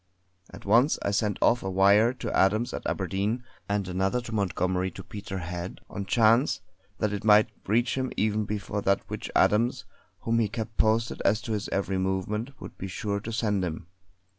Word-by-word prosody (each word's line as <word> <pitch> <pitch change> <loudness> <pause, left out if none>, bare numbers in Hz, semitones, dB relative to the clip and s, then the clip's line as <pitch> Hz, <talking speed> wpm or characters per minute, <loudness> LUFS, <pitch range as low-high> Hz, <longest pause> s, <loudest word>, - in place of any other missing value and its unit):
At - - -12
once 120 +9 +4
I 100 - 0
sent 105 0 0
off 120 - +4
a 95 - -3
wire 100 +5 +5
to 130 - -4
Adams 110 +5 +2
at - - -4
Aberdeen, 105 +6 -1 0.3
and 100 -2 0
another 95 +6 0
to 120 - -9
Montgomery 95 -2 0
to 95 +1 -10
Peterhead 90 -3 -6
on 100 0 -5
chance 115 +5 +4 0.4
that 105 -1 0
it 100 - -4
might 105 +1 +5 0.2
reach 120 +4 +2
him 130 -1 -2
even 110 0 +1
before 105 0 -3
that 100 0 +1
which - - -5
Adams, 115 +4 +3 0.4
whom 115 0 +1
he 110 - +2
kept 110 0 -5
posted 115 +1 +1
as 105 +1 +3
to 115 - -5
his 105 -2 -2
every 95 -1 -1
movement, 105 +7 -2
would - - -10
be 95 - -4
sure 100 +2 -3
to 110 +3 -6
send 105 -3 0
to 90 - 0
him! 80 +1 -6
105 Hz, 190 wpm, -27 LUFS, 95-115 Hz, 0.4 s, wire